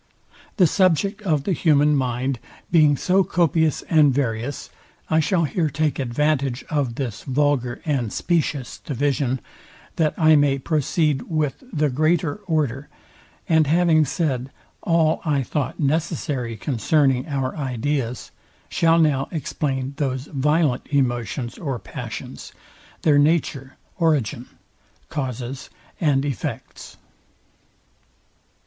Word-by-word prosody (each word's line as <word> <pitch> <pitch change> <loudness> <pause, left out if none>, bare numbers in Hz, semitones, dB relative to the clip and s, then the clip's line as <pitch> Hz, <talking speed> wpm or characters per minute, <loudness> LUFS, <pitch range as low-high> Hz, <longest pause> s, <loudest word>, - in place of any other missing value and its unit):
The 185 - +6
subject 190 +4 +2
of 155 -8 0
the 195 - -1
human 150 -2 +3
mind 130 -1 -1 0.3
being 150 -4 +5
so 190 +6 +3
copious 160 -4 +1
and 155 -3 +4
various, 125 0 -2 0.4
I 160 - +4
shall 170 +2 +2
here 155 +1 0
take 150 +1 -1
advantage 135 0 0
of 140 -6 0
this 120 -6 -4
vulgar 135 -3 0
and 130 -8 -1
spacious 155 -6 -1
division, 135 -2 -1 0.6
that 155 -2 +1
I 155 -1 +5
may 145 -2 +3
proceed 150 0 0
with 155 - -1
the 150 -6 +1
greater 155 +3 +1
order; 145 -4 -1 0.6
and 160 -2 +3
having 165 0 +4
said 135 -4 -1 0.3
all 165 -2 +2
I 145 -4 +1
thought 145 +3 -3
necessary 145 -5 -1
concerning 135 +2 +1
our 135 -3 -2
ideas, 130 -2 -2 0.4
shall 165 0 +3
now 150 -5 +2
explain 135 -3 -3
those 130 -2 -2
violent 150 -1 +1
emotions 120 -2 -1
or 135 -6 -3
passions, 95 -6 -8 0.5
their 145 -2 +5
nature, 145 -3 0 0.2
origin, 140 -7 +1 0.6
causes, 130 -1 -5 0.3
and 145 -5 +2
effects. 140 -7 -6
145 Hz, 115 wpm, -22 LUFS, 130-155 Hz, 0.6 s, The